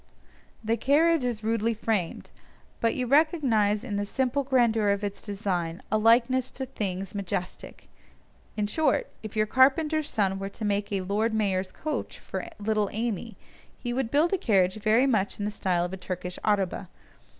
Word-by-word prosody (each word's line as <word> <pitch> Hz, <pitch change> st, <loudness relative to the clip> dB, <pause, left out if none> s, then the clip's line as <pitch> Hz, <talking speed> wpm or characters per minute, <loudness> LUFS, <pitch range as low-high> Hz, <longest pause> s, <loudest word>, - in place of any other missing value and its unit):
The 225 Hz, +1 st, +1 dB
carriage 315 Hz, +3 st, +3 dB
is 235 Hz, -3 st, -2 dB
rudely 225 Hz, +1 st, 0 dB
framed, 210 Hz, -6 st, -2 dB, 0.5 s
but 230 Hz, -, +1 dB
you 255 Hz, -, -1 dB
recognise 245 Hz, -8 st, +3 dB
in 210 Hz, -5 st, -3 dB
the 205 Hz, -, -1 dB
simple 265 Hz, +4 st, 0 dB
grandeur 235 Hz, -5 st, +2 dB
of 200 Hz, +1 st, 0 dB
its 200 Hz, -1 st, -4 dB
design 185 Hz, -5 st, -3 dB
a 215 Hz, -, +3 dB
likeness 240 Hz, +3 st, +4 dB
to 265 Hz, -, -3 dB
things 195 Hz, -6 st, -4 dB
majestic; 185 Hz, -3 st, -5 dB, 0.7 s
in 210 Hz, -, +1 dB
short, 315 Hz, -, +1 dB
if 215 Hz, -1 st, -8 dB
your 215 Hz, 0 st, +3 dB
carpenter's 295 Hz, +6 st, +3 dB
son 195 Hz, -2 st, 0 dB
were 195 Hz, 0 st, -4 dB
to 215 Hz, +2 st, -6 dB
make 205 Hz, 0 st, -1 dB
a 195 Hz, -2 st, 0 dB
"Lord 210 Hz, +4 st, 0 dB
Mayor's 190 Hz, -3 st, 0 dB
coach" 310 Hz, +8 st, -4 dB
for -, -, -6 dB
little 210 Hz, -1 st, 0 dB
Amy, 225 Hz, 0 st, -3 dB, 0.4 s
he 240 Hz, -1 st, -4 dB
would 255 Hz, -2 st, -1 dB
build 310 Hz, +8 st, +2 dB
a 385 Hz, -, +1 dB
carriage 190 Hz, -, +2 dB
very 225 Hz, +4 st, +4 dB
much 215 Hz, -7 st, +1 dB
in 205 Hz, -, -3 dB
the 210 Hz, -, -1 dB
style 180 Hz, -4 st, 0 dB
of 180 Hz, -, -6 dB
a -, -, -4 dB
Turkish 180 Hz, -1 st, -5 dB
araba. 195 Hz, -3 st, 0 dB
215 Hz, 170 wpm, -27 LUFS, 200-255 Hz, 0.7 s, likeness